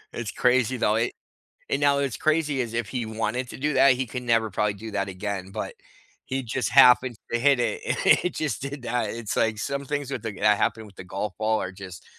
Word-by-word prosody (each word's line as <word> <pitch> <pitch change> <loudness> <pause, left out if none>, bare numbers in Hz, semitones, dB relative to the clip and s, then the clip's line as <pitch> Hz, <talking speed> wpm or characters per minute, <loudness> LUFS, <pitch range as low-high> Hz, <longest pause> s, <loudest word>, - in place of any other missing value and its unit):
It's 120 -3 -4
crazy 125 0 +2
though, 105 -2 +2
it 115 +2 0 0.6
and 140 - +1
now 140 -1 +4
it's 135 -4 -1
crazy 150 -3 +1
is 115 -2 -4
if 115 -2 -1
he 125 -3 -3
wanted 115 +3 -2
to - - -8
do 145 +3 -1
that, 140 -1 +6
he 130 +1 -2
can 125 +1 -6
never 115 -2 +2
probably 105 +1 0
do 110 +2 -8
that 100 -1 -1
again, 95 0 -5
but - - -5 0.5
he 130 0 -3
just 120 0 -2
happened 125 -2 +6 0.2
to 120 - +1
hit 140 +1 +4
it 120 - -1
and - - 0 0.3
it 180 - -1
just 150 -6 -2
did 140 0 -6
that. 120 -3 -1
It's, 115 -2 -4
like, 110 -1 +1
some 140 +6 -3
things 145 -1 -3
with - - -3
the 110 - -3
that 105 0 +4
happened 110 0 -1
with 100 - -16
the - - -8
golf 95 +2 -4
ball 110 0 +1
are 95 - -4
just 95 -2 -10
120 Hz, 235 wpm, -25 LUFS, 105-135 Hz, 0.6 s, that